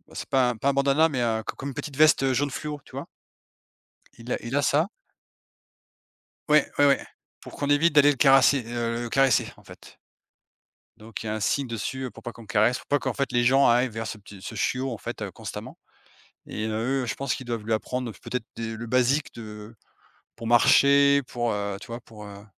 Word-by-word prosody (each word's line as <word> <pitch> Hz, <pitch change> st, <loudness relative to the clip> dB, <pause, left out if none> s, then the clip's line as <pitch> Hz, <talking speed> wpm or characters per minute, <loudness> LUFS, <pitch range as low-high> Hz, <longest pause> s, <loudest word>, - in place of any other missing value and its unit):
c'est -, -, -6 dB
pas 130 Hz, -3 st, +2 dB
pas 135 Hz, +5 st, 0 dB
un 140 Hz, -, +1 dB
bandana 140 Hz, +3 st, +3 dB
mais, 130 Hz, -4 st, -2 dB
heu, 110 Hz, -2 st, 0 dB
co -, -, -5 dB
comme 140 Hz, -, -6 dB
une 135 Hz, -, -8 dB
petite 140 Hz, -3 st, -6 dB
veste, 155 Hz, -2 st, +5 dB
heu, 135 Hz, -, +2 dB
jaune 145 Hz, +3 st, 0 dB
fluo, 150 Hz, +1 st, -5 dB
tu -, -, -18 dB
vois? -, -, -6 dB, 1.1 s
Il 120 Hz, +2 st, -6 dB
a -, -, +1 dB
il 120 Hz, +4 st, -3 dB
a 145 Hz, -, +2 dB
ça. 155 Hz, +7 st, +2 dB, 1.6 s
Ouais, 150 Hz, -1 st, +4 dB
ouais, 145 Hz, -, +6 dB
ouais, 140 Hz, -1 st, +3 dB, 0.4 s
pour -, -, -12 dB
qu'on 145 Hz, -, -2 dB
évite 150 Hz, +3 st, +4 dB
d'aller 145 Hz, 0 st, +7 dB
le -, -, -8 dB
caresser, 135 Hz, 0 st, +5 dB
heu, 120 Hz, 0 st, -2 dB
le 120 Hz, -, -4 dB
caresser, 135 Hz, -1 st, +2 dB
en -, -, -20 dB
fait -, -, -15 dB, 1.0 s
donc 110 Hz, -1 st, -8 dB
il 110 Hz, -, -8 dB
y -, -, -2 dB
a 110 Hz, -, -2 dB
un 110 Hz, -, -4 dB
signe 140 Hz, +6 st, 0 dB
dessus, 125 Hz, +3 st, -4 dB
heu, 125 Hz, -, -4 dB
pour 115 Hz, -, -14 dB
pas 120 Hz, -, -6 dB
qu'on 115 Hz, -, -13 dB
le -, -, -15 dB
caresse, 115 Hz, +3 st, +2 dB
pour -, -, -15 dB
pas 145 Hz, -, +2 dB
qu'en -, -, -2 dB
fait 140 Hz, -3 st, -2 dB
les 120 Hz, 0 st, +2 dB
gens 135 Hz, +3 st, +5 dB
arrivent 120 Hz, +1 st, +3 dB
vers 115 Hz, 0 st, -5 dB
ce -, -, -5 dB
petit 100 Hz, -1 st, -14 dB
ce -, -, -7 dB
chiot, 130 Hz, +1 st, -1 dB
en 110 Hz, -, -6 dB
fait, -, -, -6 dB
constamment. -, -, -8 dB, 0.7 s
Et 110 Hz, -, -4 dB
heu, 120 Hz, +5 st, -1 dB
eux -, -, -3 dB
je 115 Hz, -, -3 dB
pense 140 Hz, -1 st, -2 dB
qu'ils 130 Hz, -, -9 dB
doivent 115 Hz, -3 st, -3 dB
lui 115 Hz, -, 0 dB
apprendre 125 Hz, +2 st, -3 dB
peut-être 125 Hz, -3 st, -4 dB
des 115 Hz, -1 st, -5 dB
le 115 Hz, +1 st, -7 dB
basique 130 Hz, +5 st, +1 dB
de 105 Hz, 0 st, -10 dB, 0.6 s
pour 115 Hz, -, -7 dB
marcher, 140 Hz, +4 st, +5 dB
pour, 120 Hz, -1 st, -2 dB
heu, 100 Hz, -1 st, -3 dB
tu -, -, -10 dB
vois, 115 Hz, +1 st, -7 dB
pour, 105 Hz, -3 st, -12 dB
heu, 100 Hz, 0 st, -11 dB
125 Hz, 230 wpm, -25 LUFS, 115-140 Hz, 1.6 s, d'aller